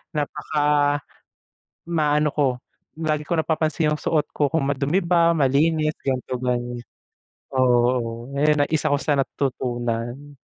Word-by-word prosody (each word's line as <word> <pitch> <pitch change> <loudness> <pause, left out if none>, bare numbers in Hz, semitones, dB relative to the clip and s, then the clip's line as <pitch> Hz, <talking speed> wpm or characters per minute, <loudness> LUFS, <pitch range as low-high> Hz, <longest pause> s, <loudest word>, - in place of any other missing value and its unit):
napaka 145 0 +1 0.9
maano 150 -2 +2
ko 145 -1 +2 0.5
lagi 155 -2 -1
ko 170 - +1
napapansin 155 -1 +1
yung 150 - -4
suot 150 -2 +1
ko 145 -2 +1
kung 160 -2 0
madumi 140 +5 +1
ba, 170 -1 +4
malinis 155 +2 +2
ganito 130 -1 -2
gano'n. 120 -1 -2 0.7
Oo, 120 -1 +1
eh, 150 +2 +4
na 145 - +3
isa 155 -1 +1
ko - - +3
sa 145 -2 +1
natutunan, 125 0 -3
145 Hz, 125 wpm, -23 LUFS, 130-155 Hz, 0.9 s, ba